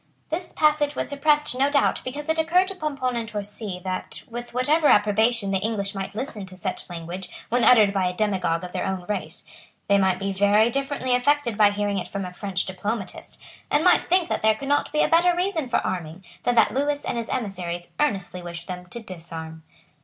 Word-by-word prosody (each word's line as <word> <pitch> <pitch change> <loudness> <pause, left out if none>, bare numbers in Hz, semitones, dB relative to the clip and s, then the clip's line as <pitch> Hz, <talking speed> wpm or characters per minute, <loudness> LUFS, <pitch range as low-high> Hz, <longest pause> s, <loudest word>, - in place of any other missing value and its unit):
This 345 +2 -3
passage 300 -2 +2
was - - -2
suppressed, 295 -1 +2
no 275 +1 +4
doubt, 285 -1 +2
because 290 +4 -5
it 320 0 +1
occurred 350 +4 +3
to 390 - -6
Pomponne 275 -7 -2
and 230 -1 -3
Torcy 205 -2 -4
that, 185 -1 -4
with 240 0 -7
whatever 290 +6 +2
approbation 210 0 +3
the 195 - +1
English 205 -1 -2
might 195 0 -5
listen 220 -3 -4
to 185 - -10
such 185 +1 -5
language 175 +2 -6 0.2
when 245 +1 +2
uttered 215 -5 +6
by 190 -2 +1
a 180 - -3
demagogue 185 -5 0
of 180 - -6
their - - -2
own 190 -2 -3
race, 210 - -3 0.4
they 200 0 +4
might 190 -2 +2
be 195 0 -2
very 205 +4 +4
differently 275 -1 -1
affected 250 -1 +2
by 210 -1 +6
hearing 205 -1 -1
it - - -5
from 200 -1 -4
a 180 - -7
French 195 -1 -2
diplomatist, 195 +3 -5 0.3
and 295 - +2
might 360 - +6
think 360 -1 +2
that - - -1
there 220 0 +4
could 275 +5 -7
not 290 - +2
be 300 - +3
a - - +3
better 345 +2 +4
reason 350 -7 -1
for 245 - +2
arming, 180 -1 -4 0.2
than 245 - +2
that 225 - +4
Lewis 285 +2 0
and 235 - -1
his 230 - -5
emissaries 180 -7 -4
earnestly 195 -10 0
wished 170 0 -8
them 180 -1 -6
to 235 +6 -8
disarm. 165 -4 -8
215 Hz, 210 wpm, -24 LUFS, 190-285 Hz, 0.4 s, uttered